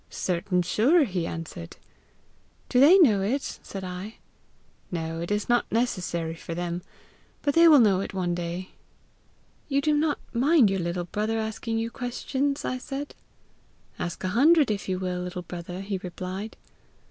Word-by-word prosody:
'Certain 180 0 -1
sure!' 265 - +4
he 180 -8 -2
answered. 160 - -7 0.9
'Do 250 - +3
they 310 +8 +8
know 230 - +5
it?' 250 +8 -2
said 195 -1 -7
I. 185 +4 -6 0.7
'No, 165 -1 -3
it 170 - -4
is 210 0 -1
not 240 0 +1
necessary 180 -8 -1
for 165 0 -7
them; 175 0 -3 0.6
but 285 - +1
they 335 +2 +7
will 310 -2 +8
know 205 -7 +5
it 195 - -4
one 180 -2 -1
day.' 175 +2 -4 1.0
'You 280 -1 +1
do 300 +1 +2
not 295 0 +1 0.2
mind 255 -2 +4
your 195 - 0
little 175 0 -2
brother 215 +5 -2
asking 220 +1 -3
you 225 +1 -2
questions?' 270 +3 -2
I 255 - -2
said. 275 +2 -6 0.9
'Ask 175 - -4
a 185 - 0
hundred, 285 - +5
if 200 -2 -3
you 185 - 0
will, 180 -1 -3
little 180 0 -5
brother,' 175 +1 -7
he 195 -1 -3
replied. 185 +4 -6
195 Hz, 160 wpm, -26 LUFS, 180-255 Hz, 1.0 s, they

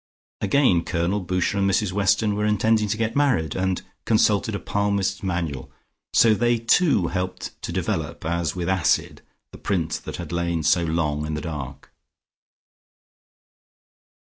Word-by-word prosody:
Again 100 -5 +3
Colonel 90 +4 -1
Boucher 90 +2 -1
and 100 0 +2
Mrs 95 0 +1
Weston 100 +2 +2
were 105 - -1
intending 105 +1 +2
to 105 +1 -1
get 115 0 -1
married, 125 - +1
and 95 -1 -1 0.2
consulted 110 -1 +2
a - - -3
Palmist's 100 -1 -1
Manual, 85 -8 -3 0.4
so 115 -2 +5
they 120 +2 +2
too 115 - +3
helped 90 0 -4
to - - -5
develop 80 +1 -3
as 85 0 -1
with 90 -2 -3
acid 95 -3 +1 0.3
the - - -12
print 80 -4 -2
that - - -5
had 85 -2 -7
lain 85 -1 -1
so 85 +3 +3
long 75 -2 -1
in 75 - -3
the 75 - -4
dark. 70 -4 -7
95 Hz, 145 wpm, -23 LUFS, 85-105 Hz, 0.4 s, so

